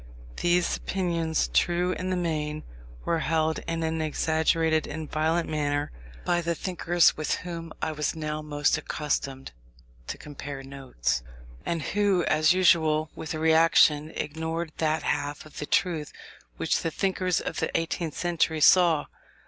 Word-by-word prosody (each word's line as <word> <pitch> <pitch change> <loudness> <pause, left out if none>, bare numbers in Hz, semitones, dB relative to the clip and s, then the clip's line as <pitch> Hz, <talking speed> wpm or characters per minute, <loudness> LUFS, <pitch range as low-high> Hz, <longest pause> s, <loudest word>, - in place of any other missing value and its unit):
These 175 0 +2
opinions, 170 -4 -1
true 175 +1 +2
in 185 0 -3
the 185 - 0
main, 155 -3 -2 0.4
were 165 - +1
held 160 0 0
in 165 0 -2
an 160 0 -1
exaggerated 160 0 +1
and 155 +1 -5
violent 160 +3 0
manner 145 -1 -1 0.3
by 175 0 +2
the 170 0 -1
thinkers 175 -1 +2
with 155 - -1
whom 165 -2 -6
I 160 - 0
was 150 +1 -2
now 155 -1 -3
most 145 -1 +1
accustomed 135 -3 -3 0.6
to - - -4
compare 140 -2 -8
notes, 135 - -2 0.5
and 165 -3 -1
who, 200 -2 +1
as 155 +1 +4
usual 160 -4 +3
with 160 - -5
a - - -4
reaction, 160 -1 +4
ignored 160 +2 -3
that 155 -1 +1
half 145 0 -2
of 155 - -11
the 150 - -4
truth 160 -6 0 0.5
which - - +1
the 165 - -1
thinkers 185 0 0
of - - -4
the - - 0
eighteenth 165 -1 -3
century 165 -2 0
saw. 165 -1 +5
160 Hz, 150 wpm, -27 LUFS, 150-170 Hz, 0.6 s, saw